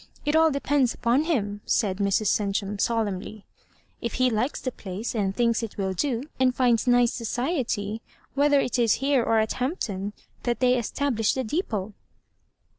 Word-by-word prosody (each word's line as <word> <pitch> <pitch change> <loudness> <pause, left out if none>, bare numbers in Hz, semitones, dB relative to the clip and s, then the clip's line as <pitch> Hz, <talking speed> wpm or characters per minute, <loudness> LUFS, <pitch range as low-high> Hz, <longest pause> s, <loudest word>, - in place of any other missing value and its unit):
It 295 +1 +1
all 320 0 +6
depends 280 -3 +1
upon 245 +6 +1
him," 205 -11 -1
said 195 -5 +1
Mra 200 +1 +1
Cen 200 0 +1
tum, 200 0 -2
solemnly; 210 -2 -2 0.6
"if 235 - -3
he 255 0 +2
likes 230 +6 -1
the 255 - -3
place, 205 +2 -5
«nd 195 -3 0
thinks 235 0 +2
it 225 -3 -6
will 190 -1 -1
do, 245 +4 -1 0.2
and 255 -1 +3
finds 245 -2 +2
nice 245 -1 +4
society, 230 - -2 0.3
whe 285 +1 +3
ther 285 -1 +5
it 255 -1 0
is 230 -3 +4
here 275 -1 +2
or 225 - +2
at 220 0 +1
Hampton 205 - -2 0.3
that 240 -1 -1
they 250 -1 +4
establish 240 -1 0
the 260 - -1
depot." 220 - -2
235 Hz, 175 wpm, -25 LUFS, 205-260 Hz, 0.6 s, all